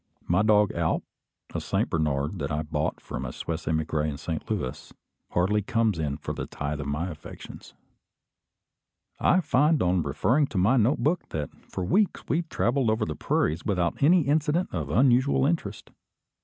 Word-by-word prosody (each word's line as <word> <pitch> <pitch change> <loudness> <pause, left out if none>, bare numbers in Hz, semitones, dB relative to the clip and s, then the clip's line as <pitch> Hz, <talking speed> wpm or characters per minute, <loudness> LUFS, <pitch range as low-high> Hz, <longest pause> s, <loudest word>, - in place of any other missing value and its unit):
My 90 +3 +3
dog 105 -1 +4
Alp, 85 -1 0 0.5
a - - -2
Saint - - 0
Bernard 75 +2 0
that 70 - -3
I 75 +1 -1
bought 75 0 -2
from 65 - -6
a 60 - -4
Swiss 80 +5 -5
emigre 80 -1 0
in 70 - -5
Saint - - -5
Louis, 65 - -4 0.4
hardly 100 +4 +1
comes 110 -4 0
in 70 -2 -2
for - - -5
a - - -4
tithe 75 +1 -4
of 70 - -5
my 80 +6 -2
affections. 75 - -11 1.4
I 185 - +4
find 150 +1 +3
on 90 0 +2
referring 110 - +1
to 105 - -5
my 100 +8 +4
note 120 +3 +2
book 165 +4 0
that 75 -3 -4 0.2
for 90 - -3
weeks 200 - +1
we 165 - +1
travelled 130 -6 0
over 110 0 +1
the 75 - -4
prairies 80 +4 0
without 90 -5 -1
any 170 +5 +6
incident 150 +4 +1
of 80 -5 -3
unusual 130 - +3
interest. 140 -10 -2
95 Hz, 170 wpm, -26 LUFS, -, 1.4 s, any